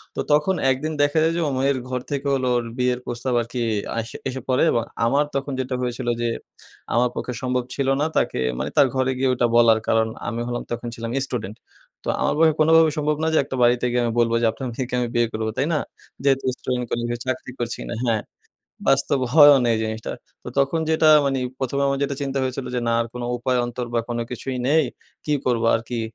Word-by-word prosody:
তো - - -5
তখন 150 +6 +3
১ 130 - +2
দিন 155 0 -2
দেখা 145 +2 +2
যায় 165 +1 +2
যে, 170 - 0
ওর 140 - -1
মেয়ের 135 0 +2
ঘর 125 0 -1
থেকে 140 0 -2
হল 135 -1 0
ওর 120 - +1
বিয়ের 125 -1 +1
প্রস্তাব 120 +2 -3
আরকি 120 +2 -5 0.4
আস 115 0 -3 0.2
এসে 130 0 -5
পড়ে 130 -1 +2
এবং 115 - +1 0.2
আমার 140 +5 +3
তখন 140 +1 -2
যেটা 130 0 -2
হয়েছিল 125 0 -3
যে, 120 - +1 0.6
আমার 120 +2 +3
পক্ষে 125 - -4
সম্ভব 125 -1 0
ছিল 140 -1 -1
না - - +2
তাকে - - +1 0.2
মানি - - -2
তার 140 - +7
ঘরে 130 0 +1
গিয়ে 130 0 +1
ওটা 125 -1 +2
বলার। 115 -1 +6
কারণ 115 0 +3 0.2
আমি 115 0 -2
হলাম 120 0 -3
তখন 120 0 -3
ছিলাম 115 0 -5 0.2
স্টুডেন্ট। 110 -5 -5 0.5
তো - - -9
আমার - - +2
পক্ষে 160 0 +5
কোনোভাবেই 160 0 +5
সম্ভব 150 0 +1
না - - +2
যে, - - +4
একটা 135 -1 -6
বাড়িতে 120 +1 +3
গিয়ে 125 0 +1
আমি 115 - 0
বলবো 115 0 +3
যে, 115 - +2
আপনার 130 +3 -6
মেয়েকে 125 +1 -4
আমি 120 - 0
বিয়ে 120 0 +3
করবো, 110 0 -2
তাই 135 - +2
না? 150 - +2 0.4
যেহেতু 135 -1 +2
স্টুডেন্ট 125 -1 -2
কলে 120 - -2 0.2
চাকরি 130 0 -3
করছি 120 -1 -3
কিনা। - - -5
হ্যাঁ, 115 -3 +1 0.7
বাস্তব 140 - +3 0.2
হয়ও 145 -2 +9
না 120 - +1
এই - - -1
জিনিসটা। 110 0 -4 0.3
তো - - -7
তখন 140 +4 +2
যেটা 160 0 +4 0.2
মানি 135 -1 0 0.2
১ম 130 +1 -2
এ - - +3
আমার 140 0 0
যেটা 140 0 -1
চিন্তা 135 -1 -2
হয়েছিল 130 0 -3
যে, 125 - 0
না - - +2
আর 115 - -1
কোনো 120 -1 -4
উপায় 125 +1 0
অন্তর 120 0 -4
বা 115 - +3
কোনো 120 -1 -2
কিছুই 130 +1 -4
নেই। 155 +1 +4 0.4
কি 150 - -1
করবো 120 -2 +1
আরকি। 115 +1 -2
125 Hz, 225 wpm, -23 LUFS, 120-140 Hz, 0.7 s, হয়ও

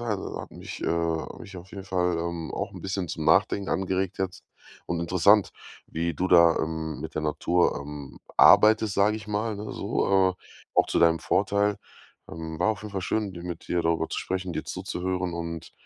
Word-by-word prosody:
hat 110 -4 -1 0.3
mich, - - -8
äh - - 0
hat 85 -1 -1
mich 100 -5 -10
auf 90 +2 -11
jeden 95 -1 -8
Fall, 90 -2 0
ähm, 85 -1 -4
auch - - -3
'n - - -9
bisschen 95 -2 -3
zum 80 -1 -4
Nachdenken 95 +5 +3
angeregt 95 -1 -1
jetzt. 95 -1 -3 0.4
Und 85 - -2
interessant, 95 +4 +4 0.3
wie 85 +1 -2
du 90 +6 -1
da, 85 -2 +6
ähm, 80 -1 -3
mit 80 +1 -7
der 80 - -2
Natur, 85 +3 +1
ähm, 70 -1 -8 0.2
arbeitest, 110 -1 +6
sage 105 +2 +3
ich 105 -1 -10
mal, 105 +1 -1
ne? 105 +1 -6
So, 95 -1 +2
äh, - - -18 0.4
auch - - +4
zu - - +1
deinem 85 -1 +4
Vorteil. 100 +2 +1 0.5
Ähm, 80 0 -6
war 95 - +2
auf 110 - -1
jeden 105 - -7
Fall 95 -2 -3
schön, 100 -1 -1
dir 85 - -8
mit 85 -2 -7
dir 85 -1 +1
darüber 80 -1 +1
zu - - -3
sprechen, 95 -2 -3
dir - - -3
zuzuhören. 90 -1 -3
Und 85 -1 -6
90 Hz, 195 wpm, -26 LUFS, 85-100 Hz, 0.5 s, da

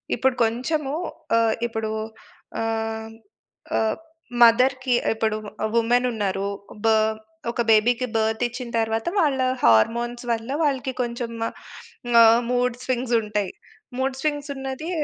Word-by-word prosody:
ఇప్పుడు 260 +1 +1
కొంచెము 270 +5 -1 0.4
ఆహ్, 225 -1 +3
ఇప్పుడు 225 -1 -3 0.7
ఆహ్, 225 0 -2 0.7
ఆహ్ 220 -1 +1 0.5
మదర్‌కి 255 +2 +5 0.2
ఇప్పుడు 220 -1 0 0.3
ఆ! - - +2
వుమెన్ 240 +2 +3
ఉన్నారు 200 -3 -2 0.4
బా 225 - +5 0.6
ఒక 235 - -1
బేబీ‌కి 235 +3 +3
బర్త్ 220 +1 +1
ఇచ్చిన 245 0 -7
తర్వాత 225 +2 -1
వాళ్ళ 285 -5 +2 0.2
హార్‌‌మోన్స్ 235 - +3
వల్ల 225 +2 -2
వాళ్ళకి 265 -3 0
కొంచెం 235 -1 -3 0.9
ఆహ్, 230 +1 +7
మూడ్ 245 -1 +1
స్వింగ్స్ 245 -1 0
ఉంటయి. 210 -3 -2 0.5
మూడ్ 265 0 -1
స్వింగ్స్ 290 -1 -2
ఉన్నది 270 +4 -5
235 Hz, 115 wpm, -23 LUFS, 225-255 Hz, 0.9 s, ఆహ్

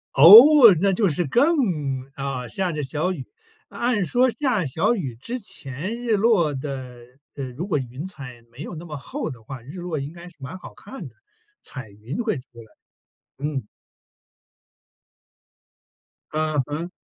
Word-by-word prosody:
哦， 230 - +10
那 200 - +3
就 195 +2 +2
是 170 +2 0
更 275 - +3 0.6
啊， 135 -2 -4
下 180 +8 -2
着 150 -1 -3
小 155 +7 -1
雨， 135 -7 -7 0.4
按 235 -5 0
说 250 +7 +2
下 240 - 0
小 160 - +1
雨 135 - -4
之 235 - -6
前 190 - -6
日 225 -4 +1
落 195 -9 +3
的， 130 -3 -7 0.3
呃， 135 -3 -5
如 160 +9 -5
果 180 -7 0
云 130 +3 -6
彩 135 -10 -9
没 120 - -18
有 170 - -7
那 160 - -8
么 155 -4 -7
厚 260 - -5
的 125 -5 -10
话， 125 +2 -9
日 140 +8 -12
落 175 -3 -4
应 140 +2 -6
该 170 +1 -12
是 175 - -16
蛮 135 +7 -8
好 - - -12
看 205 - -10
的， 120 - -18 0.5
彩 130 -6 -8
云 110 - -6
会 220 - -1
出 125 - -9 0.2
来， 115 - -11 0.8
嗯。 145 -3 -3 2.7
嗯 155 -1 -1
哼。 160 +4 -4
155 Hz, 175 characters per minute, -23 LUFS, 135-200 Hz, 2.7 s, 哦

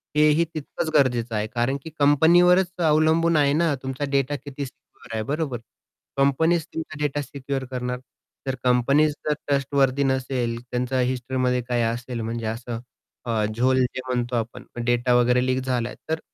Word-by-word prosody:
हेही 150 +2 +4
तितकंच 155 +1 -4
गरजेचं 120 -5 +2
आहे. 105 +1 -1
कारण 120 +4 -1
की 160 - -7
कंपनीवरच 175 +5 +5
अवलंबून 160 +1 +3
आहे 140 -1 +3
ना, 165 -1 +2
तुमचा 135 +2 -3
डेटा 140 +1 +1
किती 140 0 -6
सिक्युअर 120 -2 -14
आहे. 110 - -1
बरोबर? 140 -3 -2 0.6
कंपनीच 160 +4 +2
तुमचा 155 -1 -6
डेटा 145 0 0
सिक्युअर 135 -1 -4
करणार. 125 0 -3 0.5
तर 135 - 0
कंपनीच 140 +5 +3 0.2
जर 150 - +3
ट्रस्टवर्थी 140 -1 +2
नसेल, 130 -3 -1
त्यांचा 125 +1 -1
हिस्ट्रीमध्ये 125 0 0
काही 120 -1 +1
असेल, 120 +1 -3
म्हणजे 115 0 -4
असं 115 +1 -4 0.5
अ, 110 -3 0
झोल 130 +3 +2
जे 125 0 -1
म्हणतो 120 -1 -1
आपण, 120 +2 -3 0.2
डेटा 120 +1 +2
वगैरे 125 +1 +3
लीक 130 0 +1
झालाय 125 -2 -2
तर, 160 0 0
130 Hz, 155 wpm, -24 LUFS, 125-145 Hz, 0.6 s, कंपनीवरच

